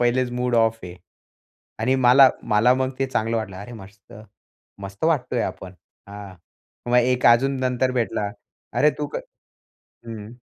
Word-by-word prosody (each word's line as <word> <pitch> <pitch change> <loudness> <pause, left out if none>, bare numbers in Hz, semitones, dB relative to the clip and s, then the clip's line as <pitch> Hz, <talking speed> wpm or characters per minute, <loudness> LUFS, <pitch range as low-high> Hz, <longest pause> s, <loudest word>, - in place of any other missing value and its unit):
पहिलेच 120 +1 +1
mood 125 0 -1
off 115 -1 +2
आहे. 90 -1 -9 0.9
आणि 130 +4 +1
मला 130 +1 +6 0.2
मला 120 +4 +4
मग 130 0 -1
ते 135 - +1
चांगलं 115 -2 -1
वाटलं, 100 -4 -5
अरे 105 +5 -9
मस्त 100 -1 -14 0.7
मस्त 100 +4 -9
वाटतोय 130 -7 0
आपण. 95 0 -6 0.3
हां, 100 -1 -10 0.6
मग 125 - +4
एक 125 +1 +1
अजून 130 +4 +4
नंतर 130 0 0
भेटला. 115 -4 -2 0.5
अरे 150 - +5
तू 150 - -2
क - - 0 0.9
हं. 110 0 -9
120 Hz, 150 wpm, -22 LUFS, 105-130 Hz, 0.9 s, मला